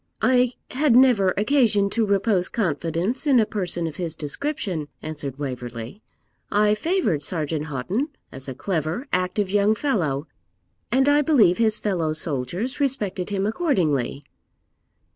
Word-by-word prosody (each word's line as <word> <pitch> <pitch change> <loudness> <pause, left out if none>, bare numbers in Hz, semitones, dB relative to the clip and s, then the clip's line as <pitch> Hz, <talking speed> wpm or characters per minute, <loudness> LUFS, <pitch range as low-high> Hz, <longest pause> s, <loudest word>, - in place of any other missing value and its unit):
'I 250 -1 +3 0.2
had 265 -2 +2
never 240 -7 +5
occasion 215 -3 +3
to 225 0 +1
repose 200 -2 +1
confidence 180 - -1
in 265 -4 +5
a 220 - +4
person 180 -5 -1
of 160 -2 -5
his 170 -3 -2
description,' 175 - -3 0.2
answered 145 -4 -5
Waverley. 125 - -6 0.5
'I 210 0 +3
favoured 215 - 0
Sergeant 155 -1 -2
Houghton 165 - -2 0.2
as 135 +1 -5
a 130 - -5
clever, 170 - -2
active 185 +2 0
young 205 +1 +3
fellow, 165 - -1 0.7
and 265 +3 +3
I 290 +1 +5
believe 245 - +4
his 220 -2 +3
fellow 170 -7 -1
soldiers 160 - -2
respected 215 -10 -1
him 200 -1 -1
accordingly.' 165 - 0
195 Hz, 135 wpm, -23 LUFS, 155-235 Hz, 0.7 s, never